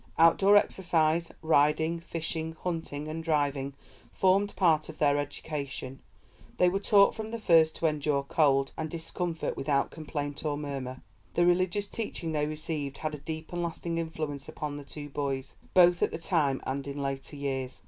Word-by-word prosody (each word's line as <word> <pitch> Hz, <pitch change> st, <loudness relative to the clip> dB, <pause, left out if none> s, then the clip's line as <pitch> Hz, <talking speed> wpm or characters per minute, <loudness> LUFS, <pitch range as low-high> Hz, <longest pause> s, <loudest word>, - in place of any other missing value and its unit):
Outdoor 195 Hz, +5 st, +6 dB
exercise, 170 Hz, -4 st, +2 dB
riding, 160 Hz, +2 st, +3 dB
fishing, 160 Hz, -1 st, -4 dB
hunting, 160 Hz, -4 st, -3 dB
and 160 Hz, +1 st, -4 dB
driving 140 Hz, -3 st, 0 dB, 0.4 s
formed 195 Hz, +2 st, +2 dB
part 160 Hz, -5 st, +3 dB
of 155 Hz, -, -9 dB
their 145 Hz, -1 st, +3 dB
education; 140 Hz, -2 st, -5 dB, 0.6 s
they 180 Hz, -, +5 dB
were 195 Hz, +2 st, 0 dB
taught 200 Hz, 0 st, +5 dB
from 220 Hz, -1 st, -5 dB
the 230 Hz, +1 st, -4 dB
first 165 Hz, -6 st, +5 dB
to -, -, -3 dB
endure 150 Hz, -2 st, +1 dB
cold 140 Hz, -2 st, +2 dB
and 160 Hz, 0 st, -3 dB
discomfort 165 Hz, +1 st, -3 dB
without 140 Hz, 0 st, 0 dB
complaint 145 Hz, -2 st, -5 dB
or 150 Hz, -2 st, -1 dB
murmur. 135 Hz, -3 st, -5 dB, 0.3 s
The 175 Hz, -, +4 dB
religious 185 Hz, +3 st, +2 dB
teaching 200 Hz, -7 st, -4 dB
they 150 Hz, -1 st, 0 dB
received 150 Hz, -2 st, -4 dB
had 155 Hz, -1 st, -3 dB
a 150 Hz, -, -5 dB
deep 160 Hz, +3 st, -6 dB
and 175 Hz, -, -1 dB
lasting 170 Hz, 0 st, -3 dB
influence 155 Hz, -4 st, -4 dB
upon 145 Hz, -1 st, -5 dB
the 145 Hz, -, -7 dB
two 145 Hz, +1 st, -8 dB
boys, 135 Hz, -2 st, -3 dB, 0.2 s
both 175 Hz, -1 st, +6 dB
at -, -, +3 dB
that 165 Hz, -, -7 dB
time 145 Hz, -8 st, +1 dB
and 135 Hz, +1 st, -3 dB
in 140 Hz, 0 st, -5 dB
later 135 Hz, +1 st, -4 dB
years. 135 Hz, -3 st, -3 dB
155 Hz, 170 wpm, -29 LUFS, 145-170 Hz, 0.6 s, Outdoor